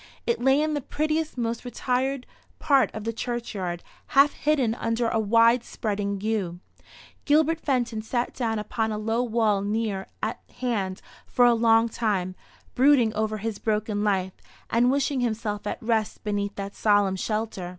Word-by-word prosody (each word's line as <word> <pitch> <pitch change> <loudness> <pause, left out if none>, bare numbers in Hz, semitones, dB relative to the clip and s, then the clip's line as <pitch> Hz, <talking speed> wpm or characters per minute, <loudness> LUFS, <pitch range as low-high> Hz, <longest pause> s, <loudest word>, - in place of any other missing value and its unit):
It 470 - 0
lay 265 +2 +4
in 310 0 0
the 290 - -1
prettiest, 310 +2 -2
most 230 -1 -2
retired 255 +1 -1 0.3
part 275 -4 +3
of 215 - -5
the 230 +1 -2
churchyard, 210 -8 -4 0.3
half 285 +1 +7
hidden 275 -7 +1
under 230 0 -1
a 225 - 0
wide 230 +3 +4
spreading 200 -3 -3
yew. 200 -5 -2 0.7
Gilbert 315 +2 +3
Fenton 240 -7 -1
sat 240 +2 -2
down 225 -3 -1
upon 220 +1 -2
a 210 - -2
low 225 +2 0
wall 220 -4 +1
near 205 -1 -2 0.2
at 220 +2 -2 0.2
hand 200 -7 -2 0.2
for 245 - +3
a 240 - +6
long 225 0 +4
time, 205 -5 -1 0.4
brooding 255 -4 +4
over 215 0 -1
his 215 0 -4
broken 210 -1 -1
life, 190 -3 0 0.4
and 240 +2 +4
wishing 275 0 +1
himself 220 -3 -2
at - - -2
rest 220 -2 -1
beneath 205 -1 -2
that 200 0 -5
solemn 205 -3 +2
shelter. 210 -2 -3
225 Hz, 160 wpm, -25 LUFS, 210-245 Hz, 0.7 s, half